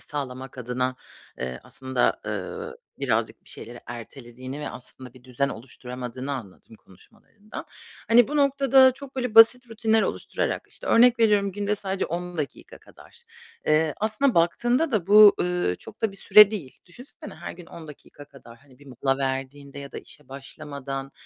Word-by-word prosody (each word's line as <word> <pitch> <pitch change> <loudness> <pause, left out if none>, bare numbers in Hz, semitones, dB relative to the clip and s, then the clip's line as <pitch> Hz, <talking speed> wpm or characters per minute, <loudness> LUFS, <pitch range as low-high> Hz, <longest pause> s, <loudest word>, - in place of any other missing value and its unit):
sağlamak 130 -2 -7
adına, 125 +1 -2 0.4
eee, 65 -1 -5
aslında, 130 -1 -1
ııı, 465 0 -5 0.2
birazcık 115 -4 -1
bir - - -11
şeyleri 120 +2 -8
ertelediğini 125 +3 -9
ve - - -4
aslında 125 0 -8
bir 130 0 -18
düzen 130 +2 -1
oluşturamadığını 125 +2 -7
anladım 110 -3 -9
konuşmalarından. 205 - -13 0.4
Hani, 235 +1 +6
bu 300 - -2
noktada 275 -2 +5
çok 275 0 -12
böyle 250 -4 -2
basit 230 +2 +7
rutinler 220 0 +2
oluşturarak, - - -3
işte, - - -11
örnek 240 0 +5
veriyorum 205 -3 +3
günde 205 +1 -1
sadece 195 -1 -3
10 175 +1 -5
dakika 150 -3 -6
kadar, 475 - -19 0.4
eee, 155 0 +2
aslında 220 +5 +1
baktığında 240 - +2
da 200 -7 0
bu, 210 0 +8
ııı, 180 - 0
çok - - -14
da 215 -3 +1
bir - - -13
süre 210 +1 +7
değil. 175 -12 -7
Düşünsene 245 +10 -12
her 170 - -8
gün 175 -1 -13
10 160 -2 -11
dakika 145 0 -13
kadar, 135 -5 -16
hani, 130 -1 -22
bir 145 - -18
mola 135 +1 -1
verdiğinde 135 +1 -4
ya 140 0 -9
da - - -5
işe 150 -3 -14
başlamadan, 135 0 -7
150 Hz, 160 wpm, -25 LUFS, 130-215 Hz, 0.4 s, bu